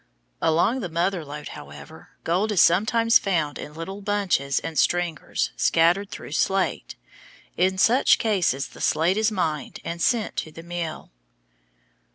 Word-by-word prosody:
Along 170 +10 +2
the 190 -7 -4
Mother 170 +2 -1
Lode, 150 0 -8
however, 70 0 -12
gold 190 +6 0
is 200 - +1
sometimes 225 +7 +4
found 165 -7 -1
in 150 - -8
little 190 +5 -7
bunches 195 -9 0
and 160 -4 -3
"stringers" 175 -3 0
scattered 175 +5 +2
through - - -9
slate. 190 +4 -1 0.6
In 185 +2 +1
such 240 +7 +4
cases 180 - 0
the - - -13
slate 170 +4 +2
is 220 0 +2
mined 160 -7 -3
and 170 0 -5
sent 230 0 0
to 155 - -3
the 165 +2 -11
mill. 170 -2 -6
175 Hz, 145 wpm, -24 LUFS, 160-200 Hz, 0.6 s, sometimes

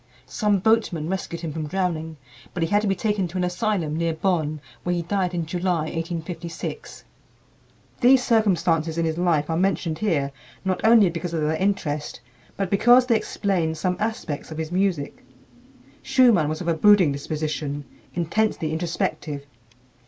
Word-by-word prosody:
Some 210 -1 +1
boatmen 190 -6 +1
rescued 170 -3 -4
him 160 -3 -4
from 155 -1 -4
drowning, 160 -3 -2 0.4
but 175 - 0
he 165 - -1
had 205 +2 +3
to 210 - -1
be 195 - +2
taken 210 -5 0
to 175 +3 -6
an 180 - 0
asylum 180 -4 -1
near 165 0 0
Bonn, 155 -4 0 0.2
where 175 0 -1
he 170 - -2
died 180 0 -1
in 170 -2 -1
July, 175 0 -1
1856. 165 +1 -5 1.0
These 255 +1 +5
circumstances 170 -8 +2
in 165 - +1
his 160 +1 -2
life 165 -4 +2
are 160 - -1
mentioned 170 -3 0
here 150 -10 0 0.3
not 185 -1 0
only 220 -5 +6
because 170 0 -4
of 160 - -1
their 155 +1 +1
interest, 160 -6 -1 0.4
but 195 -2 -2
because 245 +5 +6
they 240 -2 +3
explain 185 -7 -1
some 180 +3 -1
aspects 210 -9 -3
of 155 - -7
his 160 0 -4
music. 180 -6 -1 0.8
Schumann 225 - +4
was 155 +2 -3
of 175 - -5
a 170 - +3
brooding 185 -1 +5
disposition, 145 0 -3 0.3
intensely 170 -1 0
introspective. 160 -3 -3
170 Hz, 160 wpm, -24 LUFS, 160-195 Hz, 1.0 s, only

